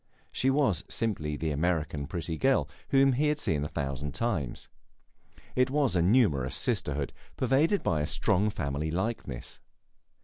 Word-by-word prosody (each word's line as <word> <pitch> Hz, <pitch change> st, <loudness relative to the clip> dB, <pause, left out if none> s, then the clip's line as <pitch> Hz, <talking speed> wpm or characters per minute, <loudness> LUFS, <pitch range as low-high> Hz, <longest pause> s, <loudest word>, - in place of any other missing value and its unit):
She 130 Hz, -, +1 dB
was 135 Hz, -, +2 dB
simply 80 Hz, -10 st, -2 dB
the 80 Hz, +1 st, -1 dB
American 75 Hz, -2 st, -1 dB
pretty 85 Hz, -1 st, -3 dB
girl, 135 Hz, +8 st, +2 dB, 0.2 s
whom 135 Hz, 0 st, +5 dB
he 145 Hz, +5 st, +2 dB
had 150 Hz, 0 st, +1 dB
seen 75 Hz, -, 0 dB
a -, -, -2 dB
thousand 70 Hz, -1 st, -4 dB
times. 95 Hz, -, -2 dB, 0.9 s
It 130 Hz, 0 st, +3 dB
was 140 Hz, -5 st, +1 dB
a 85 Hz, -, +3 dB
numerous 85 Hz, -, +3 dB
sisterhood, 70 Hz, -1 st, -1 dB, 0.2 s
pervaded 145 Hz, -, +2 dB
by 80 Hz, -3 st, +1 dB
a 75 Hz, -, -1 dB
strong 105 Hz, +4 st, +1 dB
family 70 Hz, -4 st, -2 dB
likeness. 90 Hz, -, -3 dB
90 Hz, 145 wpm, -29 LUFS, -, 0.9 s, whom